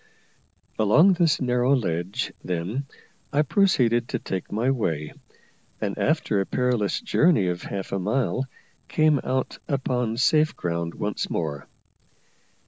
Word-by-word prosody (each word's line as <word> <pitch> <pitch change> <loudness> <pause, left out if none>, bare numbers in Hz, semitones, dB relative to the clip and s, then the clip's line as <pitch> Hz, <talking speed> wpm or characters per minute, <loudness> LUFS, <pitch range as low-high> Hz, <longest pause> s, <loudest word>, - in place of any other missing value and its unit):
Along 155 - +5
this 170 -4 +2
narrow 125 +1 +2
ledge, 90 -5 -2
then, 90 +10 -3 0.4
I 145 +1 +3
proceeded 125 - +2
to 125 - -2
take 95 -5 -5
my 115 +5 +1
way; 80 - -2 0.7
and, - - -2
after 100 - +1
a - - -2
perilous 125 -5 0
journey 155 - +3
of 90 0 -3
half 100 -1 -5
a 100 - -1
mile, 130 +6 0 0.4
came 155 -2 +3
out 130 +1 -2
upon 125 -4 -1
safe 155 +4 +3
ground 85 -1 -3
once 105 0 -3
more. 75 -5 -3
120 Hz, 130 wpm, -25 LUFS, 95-135 Hz, 0.7 s, Along